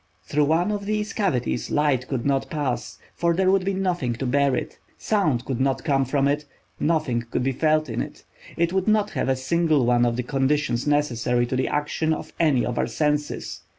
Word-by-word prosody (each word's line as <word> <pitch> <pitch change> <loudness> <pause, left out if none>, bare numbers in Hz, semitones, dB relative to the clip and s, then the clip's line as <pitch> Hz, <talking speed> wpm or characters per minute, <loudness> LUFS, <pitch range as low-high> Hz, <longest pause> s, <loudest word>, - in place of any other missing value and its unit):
Through 150 0 +1
one 165 +7 +2
of 200 -1 -3
these 215 0 -1
cavities 135 - -1
light 145 -4 +1
could 130 -4 -3
not 135 -1 0
pass, 145 -7 -3 0.2
for 170 -1 +1
there 185 +1 +3
would 195 -1 +2
be 195 +1 -1
nothing 175 -10 -1
to 125 +3 -4
bear 140 +1 +2
it. - - -5 0.2
Sound 150 - 0
could 130 -1 -2
not 135 0 0
come 135 -3 +2
from 140 +1 +1
it; 145 +1 0 0.3
nothing 150 -7 0
could 125 - -1
be 135 - +1
felt 155 +3 +1
in - - -2
it. - - -8 0.3
It 170 +1 +1
would 190 +1 0
not 215 -1 +2
have - - -1
a 130 - +3
single 155 +1 +1
one 120 0 +3
of 120 -1 +2
the 125 - -2
conditions 135 -1 0
necessary 125 -4 +1
to 125 - -3
the 130 - 0
action 155 +2 0
of - - -9
any 145 -7 +3
of 120 0 -2
our - - +1
senses. 150 -1 -2
145 Hz, 210 wpm, -24 LUFS, 130-170 Hz, 0.3 s, there